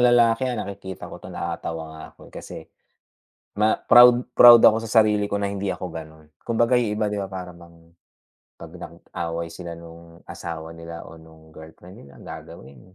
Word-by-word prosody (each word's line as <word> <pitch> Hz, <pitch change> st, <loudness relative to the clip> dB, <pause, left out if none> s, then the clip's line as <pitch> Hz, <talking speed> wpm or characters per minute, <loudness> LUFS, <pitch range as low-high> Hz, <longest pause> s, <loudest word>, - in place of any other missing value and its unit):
lalaki, 120 Hz, 0 st, +3 dB
ah, 125 Hz, -, -3 dB
nakikita 100 Hz, -2 st, -7 dB
ko -, -, -10 dB
'to -, -, -11 dB
nakakatawa 80 Hz, 0 st, -5 dB
nga 80 Hz, 0 st, -11 dB
ako -, -, -24 dB
kasi, -, -, -9 dB, 0.9 s
ma 110 Hz, +1 st, +3 dB
proud 120 Hz, 0 st, +7 dB, 0.2 s
proud 120 Hz, -1 st, +10 dB
ako 110 Hz, -, +6 dB
sa 110 Hz, 0 st, +5 dB
sarili 105 Hz, -1 st, 0 dB
ko 100 Hz, -, -5 dB
na 100 Hz, -, -1 dB
hindi 100 Hz, 0 st, -4 dB
ako 90 Hz, -, -7 dB
ganun. 80 Hz, -1 st, -11 dB, 0.2 s
Kumbaga 120 Hz, +1 st, +2 dB
'yung 110 Hz, -4 st, -1 dB
iba 105 Hz, -1 st, -1 dB
'di 105 Hz, -, -3 dB
ba 100 Hz, -, -3 dB
para 95 Hz, -2 st, -8 dB
bang, 85 Hz, -1 st, -18 dB, 0.6 s
'pag -, -, -12 dB
nag-away 85 Hz, 0 st, -6 dB
sila 85 Hz, 0 st, -8 dB
nung 85 Hz, 0 st, -14 dB
asawa 80 Hz, -1 st, -8 dB
nila 85 Hz, 0 st, -9 dB
o 80 Hz, +1 st, -13 dB
nung 80 Hz, 0 st, -18 dB
girlfriend 80 Hz, +2 st, -14 dB
nila, 70 Hz, -, -16 dB
gagawin 70 Hz, +7 st, -12 dB
90 Hz, 175 wpm, -23 LUFS, 80-110 Hz, 0.9 s, proud